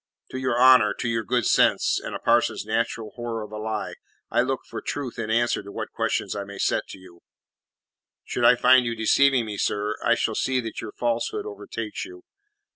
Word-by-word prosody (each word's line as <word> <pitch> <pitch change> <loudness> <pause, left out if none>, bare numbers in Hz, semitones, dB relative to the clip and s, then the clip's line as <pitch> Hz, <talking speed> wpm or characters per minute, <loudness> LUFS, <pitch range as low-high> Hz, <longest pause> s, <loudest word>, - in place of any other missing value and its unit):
To 130 - -4
your 130 -2 0
honour, 125 -5 +6
to - - -3
your 115 -1 -1
good 120 +1 0
sense - - +3
and - - -5
a - - -4
parson's - - +1
natural 115 -2 -2
horror 120 -2 -5
of 105 - -11
a 105 - -6
lie, 110 0 -3 0.4
I - - +3
look 130 +1 -1
for - - -6
truth 130 -5 -5
in 110 -1 -3
answer 120 +2 +1
to 100 0 -11
what - - -6
questions - - -2
I 100 - -3
may 100 0 -10
set - - -1
you. 90 -2 -16 1.0
Should 120 - -3
I 120 - +7
find 130 +1 +5
you 115 -1 -2
deceiving 125 +3 +3
me, 105 -2 -6
sir, 105 +1 -1
I 120 - +4
shall 115 - -1
see 130 +4 0
that 115 -3 -5
your 110 - -8
falsehood 120 - -2
overtakes 425 -1 -6
you." 360 0 -11
115 Hz, 200 wpm, -24 LUFS, 110-125 Hz, 1.0 s, I